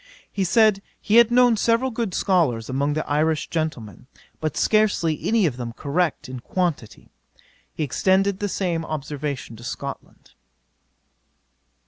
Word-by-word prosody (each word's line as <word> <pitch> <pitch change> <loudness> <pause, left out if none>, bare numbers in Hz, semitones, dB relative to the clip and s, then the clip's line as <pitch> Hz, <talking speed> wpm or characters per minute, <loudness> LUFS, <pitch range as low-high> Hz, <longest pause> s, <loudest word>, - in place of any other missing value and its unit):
'He 195 - -1
said, 205 +2 +3 0.2
he 215 +2 +2
had 235 -1 +7
known 245 -1 +5
several 230 +4 +1
good 225 -5 -3
scholars 140 - +1
among 140 +2 0
the 155 - -3
Irish 155 +1 0
gentlemen; 140 -9 -4 0.3
but 155 -2 -3
scarcely 205 -8 +2
any 225 -3 +3
of 135 -7 -1
them 120 -2 -5
correct 155 +6 -1
in 130 0 -7
quantity. 165 - -3 0.6
He 155 - -2
extended 190 +6 +1
the 205 - -2
same 175 -4 -1
observation 145 -5 -5
to 120 - -13
Scotland. 120 - -8
165 Hz, 135 wpm, -23 LUFS, 140-205 Hz, 0.6 s, had